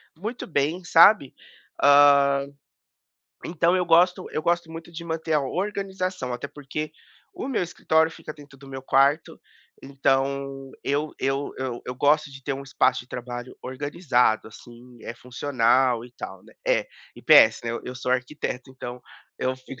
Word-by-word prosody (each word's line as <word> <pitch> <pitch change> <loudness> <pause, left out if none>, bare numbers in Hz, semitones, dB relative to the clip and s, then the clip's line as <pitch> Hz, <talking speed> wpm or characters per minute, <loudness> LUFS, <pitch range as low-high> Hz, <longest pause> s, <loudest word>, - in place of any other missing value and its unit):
muito 220 +8 -6
bem, 160 +3 -1
sabe, 170 -3 +6 0.5
ah, 140 -1 +6 1.0
então 170 +2 +1
eu 180 - +1
gosto 175 +2 +3
eu - - -1
gosto 170 -1 0
muito 165 +1 -9
de 170 +1 -7
manter 160 -1 -3
a 150 - +3
organização, 185 -3 -3
até 125 +3 -5
porque 150 +2 -6 0.4
o - - -5
meu 245 - 0
escritório 160 -2 +1
fica 155 - -9
dentro 145 -2 -16
do 135 - -15
meu 135 -1 -7
quarto, 140 +4 +2 0.4
então 135 0 -1
eu 145 +2 -1
eu 135 +1 -1
eu 130 -2 -4
eu 125 - -4
gosto 150 +3 +2
de 135 -1 -12
ter 140 - -2
um 135 - -7
espaço 135 - +1
de 120 - -15
trabalho 120 0 -7
organizado, 130 -4 0
assim, 120 +2 -15
eh, 115 - -6
funcional 125 -1 +1
e 125 - -13
tal, - - -9
né. - - -18
É, - - +2 0.3
e - - -13
PS, - - +7
né, 115 - -2
eu 125 - -6
sou 125 0 -4
arquiteto, 130 0 -3
então 125 -1 -8 0.4
eu 130 0 -1
fico 130 0 -12
140 Hz, 160 wpm, -24 LUFS, 130-160 Hz, 1.0 s, PS